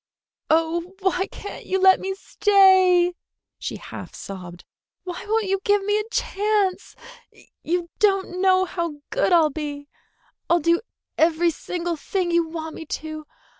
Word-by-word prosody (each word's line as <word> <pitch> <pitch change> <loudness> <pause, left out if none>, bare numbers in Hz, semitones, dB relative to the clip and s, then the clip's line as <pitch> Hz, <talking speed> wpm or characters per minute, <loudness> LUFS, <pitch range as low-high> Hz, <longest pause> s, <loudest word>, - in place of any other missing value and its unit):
"Oh, 335 +3 +1
why 380 0 +1
can't 405 - -9
you 380 - 0
let 380 0 +6
me 385 0 -3
stay!" 375 -3 +4 0.5
she - - -4
half - - -9
sobbed. 180 -3 -9 0.4
"Why 360 -1 -6
won't 440 0 +1
you 390 0 0
give 410 -1 +2
me 415 +1 +1
a 425 +1 -5
chance? 410 -3 -1 0.7
You 345 +1 -1
don't 390 -3 +1
know 375 -1 +4
how 340 -3 -3 0.2
good - - +1
I'll 325 -3 +5
be! 290 -1 -6 0.6
I'll 345 - +4
do 335 +2 +2 0.4
every 335 +1 +3
single 340 +1 -4
thing 360 +3 -2
you 340 -1 +2
want 320 -1 -6
me 320 - -9
to. 310 -1 -6
355 Hz, 145 wpm, -23 LUFS, 325-385 Hz, 0.7 s, let